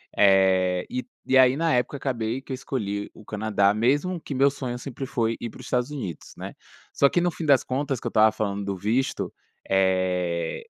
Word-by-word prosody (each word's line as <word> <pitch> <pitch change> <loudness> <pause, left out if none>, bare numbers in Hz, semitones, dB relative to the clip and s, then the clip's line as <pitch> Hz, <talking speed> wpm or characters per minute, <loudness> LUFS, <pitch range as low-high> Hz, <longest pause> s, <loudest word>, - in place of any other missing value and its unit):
Eh, 95 -2 +4
e 125 -1 -3 0.2
e 130 - +3
aí, 130 +1 +6
na 165 0 +1
época, 125 +3 0
acabei 120 -3 -2
que 135 - -7
escolhi 105 -6 -3
o 110 - -15
Canadá, 105 -2 +1
mesmo 145 - +1
que 145 - -6
o - - -3
meu 140 +2 +5
sonho 130 -3 -5
sempre 135 +1 -6
foi 115 -3 -1
ir 120 - -3
para - - -14
os 130 - -10
Estados 125 +1 0
Unidos, 95 - -6
né. - - -7 0.4
Só 140 - +4
que, 175 - +1
no 175 0 +1
fim 165 - -6
das 140 -3 +5
contas, 135 0 -2
que - - -15
eu - - 0
estava 110 0 +5
falando 100 -2 -3
do 100 0 -3
visto, 115 +8 -1 0.4
eh, 90 -3 0
120 Hz, 205 wpm, -25 LUFS, 100-135 Hz, 0.4 s, aí